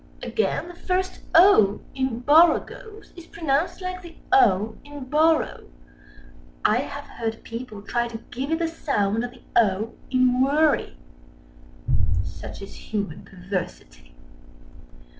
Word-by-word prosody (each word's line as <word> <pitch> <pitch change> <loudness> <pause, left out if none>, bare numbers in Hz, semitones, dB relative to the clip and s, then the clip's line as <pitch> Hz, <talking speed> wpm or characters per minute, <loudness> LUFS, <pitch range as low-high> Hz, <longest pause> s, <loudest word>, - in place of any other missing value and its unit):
Again, 440 - -1
the - - -9
first 370 +1 -2 0.2
"o" 325 - +6
in 260 -3 -2
"borogoves" 345 - +2
is 340 -2 -12
pronounced 320 +2 -1
like 365 0 -4
the 340 -2 -12 0.2
"o" 220 - +4
in 290 -1 -9
"borrow." 310 - +1 1.0
I - - +4
have - - -4
heard 225 -1 -5
people 230 -3 -7
try 240 +2 -1
to 235 -1 -6
give 265 +3 -4
it 325 - +2
the 335 0 0
sound 225 -9 -1
of 245 - -3
the 245 0 -18
"o" 215 0 +2 0.2
in 255 -1 +3
"worry". 285 - +2 1.3
Such 90 - -8
is 195 - -10
Human 205 -2 -5
Perversity. 180 - -7
255 Hz, 125 wpm, -24 LUFS, 215-330 Hz, 1.3 s, o